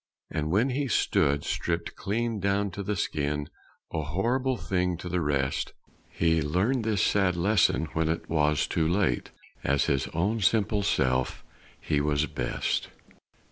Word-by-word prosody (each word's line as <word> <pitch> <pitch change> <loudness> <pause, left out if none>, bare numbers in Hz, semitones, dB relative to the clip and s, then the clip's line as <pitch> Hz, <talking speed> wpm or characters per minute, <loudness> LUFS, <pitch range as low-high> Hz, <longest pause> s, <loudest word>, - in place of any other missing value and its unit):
And 75 0 -2
when 110 +10 +2
he 140 +2 -1
stood 70 - +2
stripped 85 -1 -2
clean 115 +2 -2
down 100 +1 0
to 100 +3 -5
the 105 +1 -2
skin, 75 -4 -2 0.4
A 80 - 0
horrible 120 - 0
thing 90 -4 -1
to 90 - -7
the 90 0 0
rest, 70 -3 -1 0.4
He 80 -1 +2
learned 95 - +1
this 110 -2 +1
sad 95 -3 +2
lesson 90 -2 +3
when 80 0 +1
it 80 0 -2
was 75 -2 +2
too 80 -1 0
late 95 +4 +1 0.3
As 70 0 +2
his 70 -2 0
own 100 +8 0
simple 105 +1 +2
self 65 -9 0 0.4
he 75 -1 0
was 75 0 +1
best. 70 - -2
85 Hz, 150 wpm, -27 LUFS, 75-105 Hz, 0.4 s, lesson